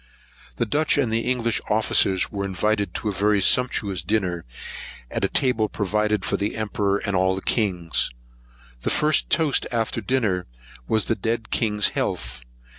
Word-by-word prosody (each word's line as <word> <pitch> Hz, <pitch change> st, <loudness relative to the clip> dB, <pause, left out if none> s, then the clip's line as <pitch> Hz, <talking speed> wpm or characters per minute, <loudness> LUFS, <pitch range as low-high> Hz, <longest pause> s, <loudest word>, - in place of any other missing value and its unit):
The 120 Hz, -, 0 dB
Dutch 150 Hz, +8 st, +1 dB
and 125 Hz, -6 st, +1 dB
English 115 Hz, 0 st, 0 dB
officers 100 Hz, -3 st, +2 dB
were 100 Hz, -1 st, -3 dB
invited 100 Hz, +2 st, -1 dB
to 110 Hz, -, -2 dB
a -, -, -2 dB
very 105 Hz, +1 st, +2 dB
sumptuous 100 Hz, -4 st, +2 dB
dinner, 90 Hz, -2 st, -1 dB, 0.7 s
at -, -, -2 dB
a -, -, +4 dB
table 115 Hz, -5 st, +1 dB
provided 105 Hz, 0 st, 0 dB
for -, -, 0 dB
the 100 Hz, +1 st, -2 dB
emperor 100 Hz, -2 st, 0 dB
and 100 Hz, -, -1 dB
all 95 Hz, +1 st, +2 dB
the 95 Hz, -, -6 dB
kings. 90 Hz, -7 st, 0 dB, 0.7 s
The -, -, -1 dB
first 150 Hz, 0 st, +2 dB
toast 155 Hz, -5 st, +2 dB
after 115 Hz, -1 st, -1 dB
dinner 105 Hz, -6 st, 0 dB, 0.4 s
was 110 Hz, -2 st, +2 dB
the -, -, +1 dB
dead 115 Hz, 0 st, -3 dB
king's 105 Hz, -3 st, +2 dB
health. -, -, -3 dB
105 Hz, 155 wpm, -24 LUFS, 95-115 Hz, 0.7 s, a